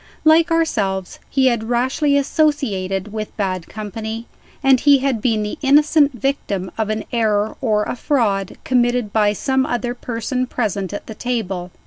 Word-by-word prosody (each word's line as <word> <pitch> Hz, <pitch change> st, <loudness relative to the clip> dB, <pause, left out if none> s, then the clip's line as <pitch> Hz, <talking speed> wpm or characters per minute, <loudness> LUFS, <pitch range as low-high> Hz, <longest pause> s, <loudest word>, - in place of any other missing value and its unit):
Like 320 Hz, +1 st, +5 dB
ourselves, 200 Hz, -, -1 dB
he 270 Hz, -1 st, +2 dB
had 235 Hz, -3 st, +1 dB
rashly 260 Hz, +4 st, +2 dB
associated 215 Hz, -, 0 dB
with 215 Hz, -1 st, -5 dB
bad 185 Hz, -4 st, -2 dB
company; 220 Hz, +2 st, -6 dB, 0.4 s
and 265 Hz, -1 st, +5 dB
he 285 Hz, +1 st, +6 dB
had 260 Hz, -4 st, -1 dB
been 220 Hz, -3 st, +1 dB
the 210 Hz, +9 st, -5 dB
innocent 295 Hz, +1 st, +4 dB
victim 215 Hz, -8 st, -2 dB
of 220 Hz, -1 st, -2 dB
an 215 Hz, 0 st, -2 dB
error 215 Hz, -2 st, +1 dB
or 215 Hz, -4 st, +1 dB
a -, -, -3 dB
fraud, 220 Hz, -8 st, 0 dB
committed 245 Hz, -3 st, +1 dB
by 210 Hz, -2 st, +3 dB
some 265 Hz, +5 st, 0 dB
other 245 Hz, -1 st, -2 dB
person 250 Hz, +1 st, -3 dB
present 205 Hz, -6 st, -2 dB
at 205 Hz, -, -6 dB
the 220 Hz, -, -7 dB
table. 195 Hz, -7 st, -3 dB
230 Hz, 155 wpm, -20 LUFS, 210-265 Hz, 0.4 s, he